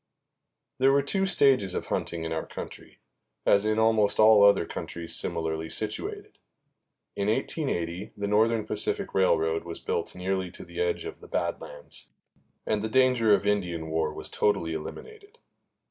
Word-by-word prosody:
There 135 +1 +5
were 140 0 +3
two 195 +7 0
stages 130 - +3
of - - -3
hunting 85 -1 -3
in 80 0 -3
our 80 - -3
country, - - -9 0.5
as 100 +1 +4
in 110 0 +1
almost 110 -2 +3
all 110 -1 +7
other 100 -4 +5
countries 85 0 -4
similarly 80 -1 -2
situated. 110 +4 -5 0.8
In 100 0 -1
1880 105 - -2
the 100 0 -2
Northern 110 +1 +2
Pacific 105 -1 -2
Railroad 80 -3 +2
was 85 -1 -7
built - - -3
nearly 95 0 -2
to - - -10
the - - -5
edge 450 -2 -1
of 420 - -7
the - - -13
Bad - - -2
Lands, - - -10 0.6
and 105 -1 0
the 110 - -3
danger 125 -3 +3
of 100 - -3
Indian 90 -6 -1
war 80 -1 0
was - - -7
totally 85 -6 0
eliminated. 420 - -9
105 Hz, 160 wpm, -27 LUFS, 85-115 Hz, 0.8 s, all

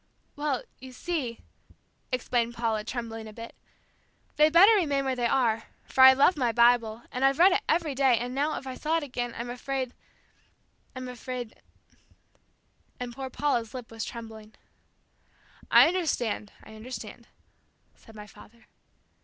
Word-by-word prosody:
"Well, 290 -3 -2 0.2
you 260 0 -11
see," 265 -7 -4 0.7
explained 240 -1 -1
Paula, 225 -3 -1
trembling 225 -1 -6
a 215 - -11
bit, 230 +1 -9 0.8
"they'd 305 +1 +4
better 385 +7 +7
remain 285 -9 +1
where 265 -1 0
they 240 -1 0
are, 230 -3 +1 0.2
for 265 - 0
I 265 0 +10
love 280 +7 +4
my 250 -5 0
Bible, 235 -1 +3
and 255 - -3
I've 270 0 +3
read 365 +3 +6
it - - +1
every 325 -4 +1
day, 265 -3 +3
and 245 +2 -4
now 290 +3 -1
if - - -8
I 260 - -5
saw 315 +5 -1
it 325 - -3
again, 245 -3 -4
I'm 240 +1 -5
afraid 260 0 -4 1.0
I'm 255 0 -6
afraid 250 -1 -7 0.7
" - - -41
and 245 -1 -5
poor 265 +1 -6
Paula's 245 -5 -1
lip 245 -3 -8
was 225 -1 -5
trembling. 220 -2 -9 1.1
"I - - +7
understand, 270 - -2
I 220 - -13
understand," 225 +4 -9 0.7
said 225 - -18
my 210 -1 -9
father. 230 +2 -17
250 Hz, 155 wpm, -27 LUFS, 230-275 Hz, 1.1 s, I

